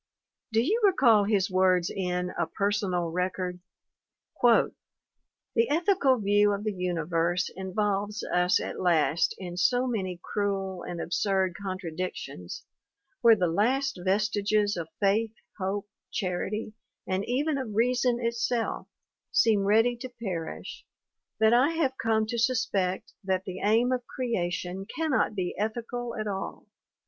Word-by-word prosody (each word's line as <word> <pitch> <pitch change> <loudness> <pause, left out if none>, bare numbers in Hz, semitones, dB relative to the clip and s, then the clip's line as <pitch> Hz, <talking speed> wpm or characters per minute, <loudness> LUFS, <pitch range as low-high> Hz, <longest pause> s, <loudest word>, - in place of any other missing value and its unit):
Do 225 +1 +3
you 415 - +1
recall 240 - +5
his 200 -2 +1
words 185 -1 +3
in 180 -1 -1
A 170 - -2
Personal 185 -2 -1
Record? 180 0 -2 0.8
"The 230 0 0
ethical 315 -4 +3
view 205 -1 +3
of 200 +1 -3
the 215 -1 -1
universe 175 -1 -1
involves 200 +2 -1
us 180 +1 +2
at - - -5
last 170 -2 +2
in 175 -2 -7
so 245 +8 +3
many 190 -8 -2
cruel 195 -2 -2
and 175 0 -6
absurd 190 +1 0
contradictions, 180 - -5 0.6
where 230 -1 +7
the 185 -4 +1
last 240 +8 +1
vestiges 205 +1 +1
of 165 -2 -5
faith, 215 +2 +1 0.2
hope, 200 +2 -2 0.2
charity, 200 +4 -2 0.3
and 190 +1 0
even 280 +4 0
of 225 -6 -5
reason 245 +1 +2
itself, 235 0 -1 0.4
seem 210 -3 +3
ready 225 +4 +4
to 255 +2 -7
perish, 195 -9 -6 0.6
that 220 +1 +5
I 265 +7 +4
have 285 -5 +1
come 220 -1 +2
to 235 +2 -3
sus 245 +1 +2
pect 185 -1 -2
that 190 -1 0
the 185 -1 -6
aim 225 +4 +3
of 250 -1 -2
creation 190 -5 -3
cannot 305 -6 0
be 180 -3 -2
ethical 235 +2 -3
at 215 - -3
all. 195 -2 -5
205 Hz, 135 wpm, -28 LUFS, 185-235 Hz, 0.8 s, where